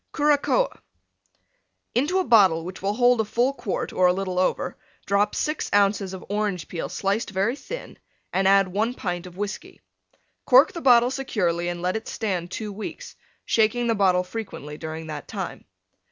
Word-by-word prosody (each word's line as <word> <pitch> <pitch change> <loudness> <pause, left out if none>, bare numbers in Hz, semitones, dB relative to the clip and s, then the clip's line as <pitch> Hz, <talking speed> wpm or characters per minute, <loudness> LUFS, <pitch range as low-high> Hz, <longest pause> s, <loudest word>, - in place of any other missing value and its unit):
CURACOA 295 - +2 1.1
Into 295 +10 +1
a 375 - +2
bottle 190 - +4
which 185 +1 -8
will 200 +2 -1
hold 245 -1 +4
a - - 0
full 240 +5 +1
quart, 240 -7 -4
or 185 - +4
a 180 - +4
little 185 -1 -2
over, 185 - 0 0.3
drop 200 +1 +1
6 305 +1 -2
ounces 200 -1 +2
of 185 - -10
Orange 205 -5 -2
Peel 170 - -5
sliced 200 +4 -1
very 195 +5 0
thin, - - -8 0.3
and 190 +1 +2
add 195 -1 +5
1 220 +6 -1
pint 180 -4 -4
of 180 0 -13
Whiskey. 205 0 -5 0.7
Cork - - +6
the 335 - -6
bottle 245 -2 +5
securely 180 -11 -1
and 175 0 -4
let 180 +2 0
it 220 - -4
stand 185 -6 -3
two 210 +2 -5
weeks, 220 - -7 0.3
shaking 225 +2 +2
the 230 - +2
bottle 185 -3 +3
frequently 180 -7 -7
during 160 +1 -6
that 150 -2 -7
time. - - -6
200 Hz, 170 wpm, -24 LUFS, 180-240 Hz, 1.1 s, Cork